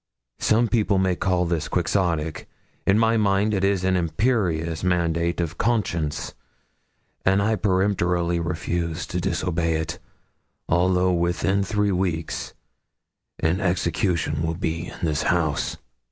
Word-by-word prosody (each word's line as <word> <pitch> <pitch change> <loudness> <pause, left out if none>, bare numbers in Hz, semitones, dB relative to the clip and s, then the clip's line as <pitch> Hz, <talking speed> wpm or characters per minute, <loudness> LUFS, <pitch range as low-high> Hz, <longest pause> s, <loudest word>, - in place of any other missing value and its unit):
Some 115 +2 +3
people 105 -4 +2
may 95 -1 +2
call 90 -1 +1
this 85 -2 -1
Quixotic. 85 -4 -1 0.4
In 95 - +5
my 115 0 +3
mind 105 0 +2
it 95 -1 0
is 100 -2 +2
an 95 0 +2
imperious 85 -2 0
mandate 85 -1 +1
of 85 -1 -3
conscience; 90 -9 -1 0.9
and 95 +1 +3
I 110 +2 +2
peremptorily 90 -3 +1
refuse 85 -1 -2
to 90 - -3
disobey 85 -3 0
it, 80 0 -3 0.7
although 90 +1 +2
within 90 +3 +1
three 105 0 0
weeks 90 -3 -2 0.8
an 85 +4 +1
execution 85 -3 0
will 80 0 -1
be 85 0 -3
in - - -9
this 75 -3 +1
house!' 80 -5 0
90 Hz, 125 wpm, -24 LUFS, 85-95 Hz, 0.9 s, In